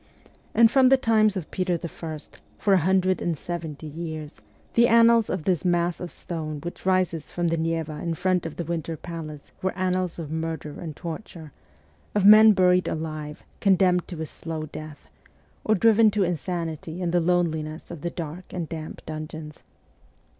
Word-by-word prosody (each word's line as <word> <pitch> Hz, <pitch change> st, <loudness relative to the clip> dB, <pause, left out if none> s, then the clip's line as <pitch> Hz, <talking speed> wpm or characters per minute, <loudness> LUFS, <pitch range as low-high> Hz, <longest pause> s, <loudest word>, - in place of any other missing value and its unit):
And 230 Hz, 0 st, +6 dB
from 265 Hz, 0 st, +5 dB
the 270 Hz, +1 st, +6 dB
times 215 Hz, -5 st, +3 dB
of 175 Hz, -, -6 dB
Peter 180 Hz, -2 st, 0 dB
I., 165 Hz, -1 st, -5 dB, 0.4 s
for 200 Hz, -, +2 dB
a 190 Hz, -, +5 dB
hundred 185 Hz, +1 st, +2 dB
and 170 Hz, -3 st, -1 dB
seventy 160 Hz, -2 st, -6 dB
years, 155 Hz, -1 st, -7 dB, 0.3 s
the 235 Hz, +1 st, +5 dB
annals 230 Hz, -1 st, +5 dB
of 185 Hz, -4 st, -2 dB
this 180 Hz, -2 st, +1 dB
mass 175 Hz, -1 st, +1 dB
of 180 Hz, -, -6 dB
stone 155 Hz, -3 st, -5 dB
which 175 Hz, +2 st, -7 dB
rises 185 Hz, -4 st, +1 dB
from 175 Hz, -1 st, 0 dB
the 165 Hz, -, +1 dB
Neva 160 Hz, -1 st, -2 dB
in 170 Hz, -1 st, -2 dB
front 180 Hz, 0 st, 0 dB
of 160 Hz, -, -8 dB
the 170 Hz, -, -3 dB
Winter 165 Hz, -1 st, -3 dB
Palace 155 Hz, -3 st, -8 dB
were 190 Hz, 0 st, -2 dB
annals 185 Hz, -1 st, -1 dB
of 160 Hz, -3 st, -6 dB
murder 160 Hz, -2 st, -4 dB
and 160 Hz, -4 st, -6 dB
torture, 165 Hz, -2 st, -8 dB, 0.6 s
of 205 Hz, -2 st, +2 dB
men 215 Hz, +1 st, +9 dB
buried 180 Hz, -1 st, +3 dB
alive, 155 Hz, -1 st, -5 dB, 0.2 s
condemned 185 Hz, -2 st, +3 dB
to 175 Hz, -4 st, -7 dB
a -, -, -3 dB
slow 160 Hz, 0 st, -5 dB
death, 155 Hz, 0 st, -10 dB, 0.6 s
or 215 Hz, -, +3 dB
driven 225 Hz, +2 st, +5 dB
to 205 Hz, -1 st, +1 dB
insanity 170 Hz, -1 st, -3 dB
in 175 Hz, -2 st, -1 dB
the 175 Hz, -, +3 dB
loneliness 165 Hz, -3 st, -1 dB
of 170 Hz, -4 st, -8 dB
the 175 Hz, -, -2 dB
dark 170 Hz, +1 st, -6 dB
and 175 Hz, -3 st, -4 dB
damp 160 Hz, -1 st, -7 dB
dungeons. 155 Hz, 0 st, -7 dB
170 Hz, 175 wpm, -25 LUFS, 160-185 Hz, 0.6 s, men